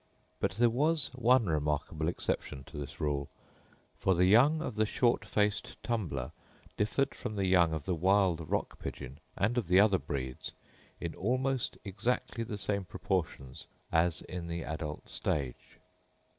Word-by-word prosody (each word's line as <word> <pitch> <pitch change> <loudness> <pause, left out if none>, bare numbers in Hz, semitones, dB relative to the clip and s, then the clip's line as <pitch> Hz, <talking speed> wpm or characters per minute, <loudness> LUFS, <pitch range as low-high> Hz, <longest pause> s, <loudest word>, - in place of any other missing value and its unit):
But - - 0
there 120 +4 +4
was 150 +4 +2
one 125 -1 +4
remarkable 75 0 -1
exception 75 -5 -2
to 75 - -11
this 70 -1 -7
rule, 70 -3 -1 0.7
for 95 - +3
the 90 +2 +4
young 130 +11 +6
of 145 -6 -3
the 110 0 +1
short 120 +2 +2
faced 105 -1 0
tumbler 80 - -2 0.4
differed 130 +6 +1
from 110 -4 -5
the 100 -1 0
young 90 -3 +4
of 80 -3 -3
the 95 - 0
wild 90 -2 +2
rock - - -1
pigeon, 65 +4 -7 0.2
and 115 +5 +2
of 110 - -4
the 90 +2 +6
other 100 -2 +5
breeds, 65 -2 -5 0.5
in - - -4
almost 130 +4 -1
exactly 115 +4 -1
the 105 -2 -5
same 100 0 -1
proportions 85 -8 -3 0.2
as 80 0 +2
in 90 -2 -6
the 85 0 -3
adult 75 -1 -5
stage. 65 -5 -3
95 Hz, 155 wpm, -32 LUFS, 80-115 Hz, 0.7 s, young